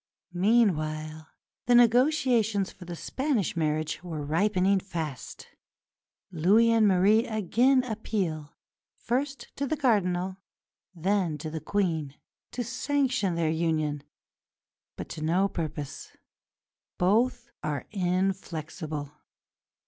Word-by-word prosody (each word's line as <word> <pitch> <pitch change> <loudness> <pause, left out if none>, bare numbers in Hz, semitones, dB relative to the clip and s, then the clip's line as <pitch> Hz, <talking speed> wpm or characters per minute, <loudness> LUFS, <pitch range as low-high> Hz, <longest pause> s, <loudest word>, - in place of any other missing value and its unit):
Meanwhile 155 -7 +1 0.4
the 245 - +5
negotiations 240 -4 +3
for 180 - -13
the 175 0 -6
Spanish 260 - -1
marriage 155 0 -1
were 160 -5 -5
ripening 190 +4 +2
fast. 160 -8 -6 0.8
Louis 200 +8 +4
and 225 -2 +4
Marie 205 +5 +4
again 235 +5 +2
appeal, 195 -10 -3 0.4
first 270 +2 -3
to 280 - -1
the 310 - -1
Cardinal, 190 -8 +1 0.6
then 180 -2 0
to 155 +1 -6
the 160 0 -5
Queen, 160 -6 -1 0.3
to 245 - -4
sanction 255 - 0
their 165 -2 +1
union, 155 -3 0 0.9
but - - -7
to 155 - -7
no 175 +5 +2
purpose; 155 -6 -6 0.8
both 230 +6 +1
are 145 -3 -3
inflexible. 175 -6 -2
185 Hz, 105 wpm, -27 LUFS, 160-230 Hz, 0.9 s, the